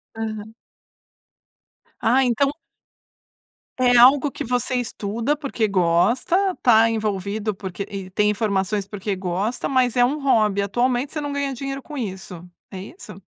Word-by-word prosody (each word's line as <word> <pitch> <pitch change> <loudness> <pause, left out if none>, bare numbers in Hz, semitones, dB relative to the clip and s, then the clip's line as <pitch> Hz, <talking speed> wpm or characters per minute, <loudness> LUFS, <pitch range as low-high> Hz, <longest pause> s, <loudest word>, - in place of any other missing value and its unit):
Aham. 220 -1 -6 1.4
Ah 260 +4 +3
então 260 +3 +1 1.3
É 250 -1 +4
algo 265 +4 +6
que - - -6
você 250 +1 -1
estuda 235 +2 -2
porque 270 -7 -1
gosta, 235 - +1
tá 225 -2 +5
envolvido 210 -1 -2
porque 190 0 -6
e 195 -2 -6
tem 210 +2 +1
informações 200 -1 -1
porque 200 0 -4
gosta 190 +6 -2
mas 255 -3 +2
é 245 - +4
um 275 +5 +1
hobby, 215 -7 +2
atualmente 245 +6 0
você 305 - -3
não 290 -1 -4
ganha 280 -1 -2
dinheiro 275 +2 -5
com 300 - -10
isso 190 - -6 0.3
é 190 -2 -7
isso? 325 - -11
225 Hz, 140 wpm, -22 LUFS, 200-260 Hz, 1.4 s, algo